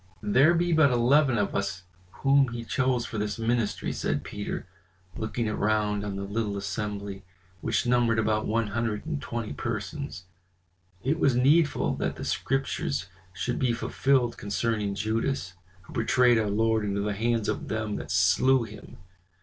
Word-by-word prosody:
"There 135 +11 +5
be 175 0 +1
but 155 -3 +5
eleven 125 +2 +3
of 100 -1 0
us 100 -2 -2 0.4
whom 140 0 +5
He 120 -1 -5
chose 130 -1 0
for 110 - -4
this 105 0 -2
ministry," 115 -1 -1
said - - -1
Peter, 105 0 -5 0.5
looking 110 +1 -2
around 105 -1 0
on 100 -1 -4
the 100 - -4
little 100 0 -2
assembly, 100 -1 -4 0.4
which - - 0
numbered 120 -2 +3
about 110 -1 +1
one 115 +1 +1
hundred 110 -1 -2
and 70 - -3
twenty 115 +3 -4
persons. 115 -1 -4 0.8
"It 150 +6 0
was 135 -6 +3
needful 145 +5 +3
that - - -2
the - - -6
Scriptures 135 -6 -1 0.2
should 95 +7 -3
be 125 -2 +2
fulfilled 130 0 +1
concerning 105 -1 -1
Judas, 110 0 -1 0.3
who - - -14
betrayed 120 +1 +4
our 105 -2 0
Lord 110 +1 +2
into 100 -1 -1
the 105 0 -1
hands 115 +1 0
of - - -2
them 110 -1 -2
that - - -7
slew 95 +8 +4
him. 105 -1 -11
110 Hz, 160 wpm, -27 LUFS, 105-125 Hz, 0.8 s, There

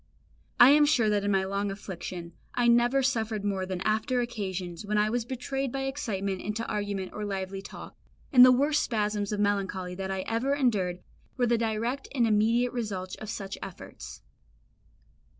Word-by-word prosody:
I 245 +3 +9
am 295 +1 +6
sure 230 -7 +3
that 205 -1 +1
in 205 - 0
my 195 -1 +2
long 200 +1 -2
affliction 180 -3 -7 0.2
I 245 -1 +2
never 240 +3 +4
suffered 225 -5 -1
more 190 -2 -1
than 185 -1 -4
after 220 +5 +1
occasions 190 -7 -4
when 210 +1 -1
I 210 +1 +2
was 240 -1 -1
betrayed 265 +1 -3
by 270 +1 -3
excitement 200 -9 -3
into 215 +3 -3
argument 205 -2 -3
or 210 - -5
lively 195 -1 -4
talk, 195 - -10 0.4
and 250 -2 +10
the 255 - +9
worst 290 +4 +3
spasms 210 -4 -1
of 210 - -2
melancholy 195 -3 -1
that 190 +1 -5
I 190 0 -2
ever 235 +7 0
endured 195 -10 0 0.4
were 245 - +2
the 240 0 +3
direct 230 +4 -2
and 240 -3 +3
immediate 230 +3 +2
results 195 -6 -4
of 215 - -8
such 195 -3 -5
efforts. 195 -2 -9
210 Hz, 175 wpm, -28 LUFS, 195-245 Hz, 0.4 s, and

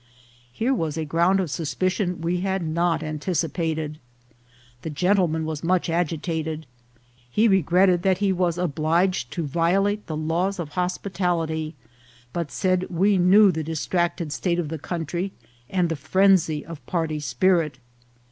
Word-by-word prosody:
Here 235 - 0
was 165 - -2
a 160 - -2
ground 170 +5 +2
of 180 -6 -2
suspicion 180 +3 -1
we 175 +2 0
had 190 0 -1
not 165 0 0
anticipated. 155 -1 -2 0.8
The 160 - -5
gentleman 170 0 +1
was 155 -1 -4
much 175 0 +1
agitated; 160 -1 -2 0.6
he 215 - +3
regretted 185 -1 +4
that 190 0 +2
he 200 -1 +1
was 175 -2 0
obliged 170 -2 +1
to 170 - -2
violate 195 +7 +1
the 155 - -3
laws 170 +5 0
of 170 -4 -4
hospitality, 175 -3 -2 0.6
but 170 -4 -2
said 185 -1 0
we 190 +2 +2
knew 195 +3 +6
the 160 -2 -3
distracted 170 +1 -1
state 175 0 0
of 170 -4 -2
the 160 0 -4
country, 175 +4 -3 0.4
and 180 -2 +1
the 165 - -2
phren 190 +6 +4
sy 155 -3 -4
of 165 -3 -9
party 160 -3 -1
spirit. 165 -2 +1
170 Hz, 145 wpm, -24 LUFS, 160-185 Hz, 0.8 s, knew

